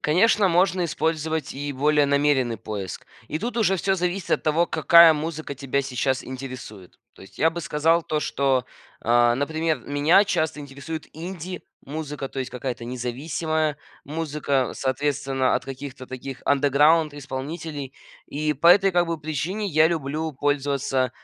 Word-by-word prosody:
Конечно, 195 +5 +3
можно 180 +1 +2
использовать 160 -2 -2
и 145 +1 -4
более 145 +2 +2
намеренный 140 -4 +2
поиск. 100 -4 -6 0.2
И 155 - -2
тут 240 +1 -3
уже 210 -5 +3
всё 195 +2 +1
зависит 180 +1 -2
от - - +2
того, 160 +3 +2
какая 170 +1 +7
музыка 155 -1 -4
тебя 135 +1 -1
сейчас 130 0 -1
интересует. 130 -7 -9 0.2
То - - -15
есть 95 - -16
я 160 - +4
бы 170 +1 -5
сказал 165 +2 +2
то, 155 -1 -2
что, 135 -3 +1 0.4
э, 120 0 +4
например, 155 +2 -1
меня 145 +7 +4
часто 160 -6 -1
интересует 145 +3 -7
инди-музыка, 160 -4 -7
то 135 - -8
есть 130 - -3
какая-то 125 -2 -4
независимая 150 +5 -2 0.3
музыка, 145 -4 -1
соответственно, 135 -1 0
от - - -6
каких-то 135 -1 -8
таких 130 0 -7
underground 145 +3 +4
исполнителей. 145 +1 -6 0.3
И 150 +1 -1
по 160 +5 +3
этой, 195 +2 +6
как 175 -1 +3
бы, 165 -1 -2
причине 160 +8 -3
я 160 -3 +4
люблю 160 0 -2
пользоваться, 140 -2 0
150 Hz, 145 wpm, -24 LUFS, 135-160 Hz, 0.4 s, какая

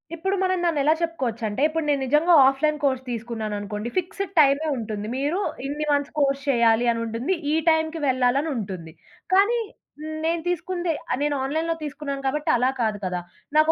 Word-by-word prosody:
ఇప్పుడు 385 +4 -1
మనం 370 0 +1
దాన్నెలా 310 -3 +3
చెప్పుకోవచ్చంటే, 240 -9 -2
ఇప్పుడు 320 0 -2
నేను 285 -2 +2
నిజంగా 300 +6 +3
ఆఫ్‌లైన్ 300 +3 +1
కోర్స్ 260 -2 +1
తీసుకున్నానునుకోండి. 220 -2 -4
ఫిక్సెడ్ 380 +2 -3
టైమే 285 +1 +4
ఉంటుంది. 215 -2 -4
మీరు 295 +7 0 0.3
ఇన్ని 295 +2 -3
మంత్స్ 285 -1 0
కోర్స్ 275 -1 +2
చేయాలి 235 -2 +4
అనుంటుంది. 230 +9 -2 0.2
ఈ - - +3
టైంకి 320 0 +1
వెళ్ళాలనుంటుంది. 245 - 0 0.4
కానీ, 405 +5 +4 0.7
నేను 335 0 0
తీసుకుంది 355 0 -1 0.2
ఆహ్, - - 0
నేను 295 0 +1
ఆన్‌లైన్‌లో 320 +4 -1
తీసుకున్నాను 285 -2 -5
కాబట్టి 300 +3 -1
అలా 250 +2 +2
కాదు 215 -2 0
కదా! 180 -1 -2 0.4
నాకు 310 +1 +5
280 Hz, 150 wpm, -24 LUFS, 235-320 Hz, 0.7 s, నాకు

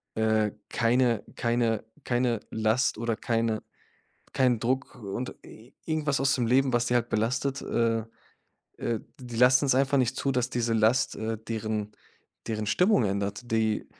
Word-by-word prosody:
äh, 110 -1 +2 0.2
keine 120 -1 +2
keine 115 -2 0 0.2
keine 120 -2 +1
Last 110 +4 +1
oder 115 0 -1
keine 115 -1 -1 0.7
keinen 125 -4 +3
Druck 130 +4 -1
und 105 +5 -4
i 115 +4 -15
irgendwas 150 -3 0
aus 135 0 +3
dem 120 -3 0
Leben, 130 +1 +3
was 120 0 +2
die 120 - +1
halt 120 -1 +2
belastet, 135 +5 0
äh 115 -1 0 0.7
äh, 115 -2 -2 0.2
die 120 -2 -8
lassen's 130 +2 +5
einfach 135 +1 +3
nicht 125 -1 +1
zu, 140 - 0
dass 125 -1 0
diese 120 -2 0
Last, 115 +5 +2
äh, 110 0 -3
deren 110 -1 -3 0.6
deren 110 -1 -2
Stimmung 180 - +3
ändert. 100 +2 -2
Die 110 -1 +1
115 Hz, 150 wpm, -27 LUFS, 110-130 Hz, 0.7 s, lassen's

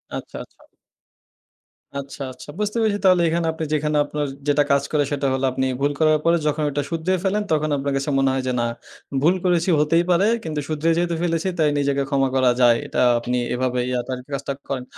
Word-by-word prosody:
আচ্ছা, - - -7
আচ্ছা। - - -23 1.3
আচ্ছা, 140 0 -6
আচ্ছা 130 - -13
বুঝতে 210 +2 -1
পেরেছি 210 -2 +1
তাহলে 185 -2 +5
এখানে 170 0 0
আপনি 160 - -5
যেখানে 150 0 0
আপনার 150 0 -3 0.2
যেটা 145 0 +4
কাজ 140 0 +3
করে 150 -2 +2
সেটা 140 -1 0
হলো 130 0 0
আপনি 130 +1 -1 0.2
ভুল 145 - +2
করার 155 -1 +4
পরে 170 0 +4
যখন 150 +1 0
এটা 145 +1 -1
শুধরিয়ে 175 +3 -1
ফেলেন 205 +2 +1
তখন 155 0 +1
আপনার 140 0 -2
কাছে 140 +2 -2
মনে 135 0 +3
হয় 130 0 -1
যে, 130 - +1
না, 120 - +1 0.6
ভুল 170 +6 +4
করেছি 175 0 +2
হতেই 165 +3 +3
পারে। 180 +3 +4 0.2
কিন্তু 155 -2 -3
শুধরে 155 +1 0
যেহেতু 170 -1 0
ফেলেছি 165 0 0
তাই 155 -2 +3
নিজেকে 140 0 +1
ক্ষমা 135 -1 +2
করা 130 -2 +4
যায়। 120 -1 +6
এটা - - -1 0.2
আপনি 125 +1 -2 0.2
এভাবে 125 0 -1 0.3
তার 130 -1 -3
কাজটা 140 0 -3 0.2
করেন। 130 -2 -2
150 Hz, 200 wpm, -22 LUFS, 135-165 Hz, 1.3 s, যায়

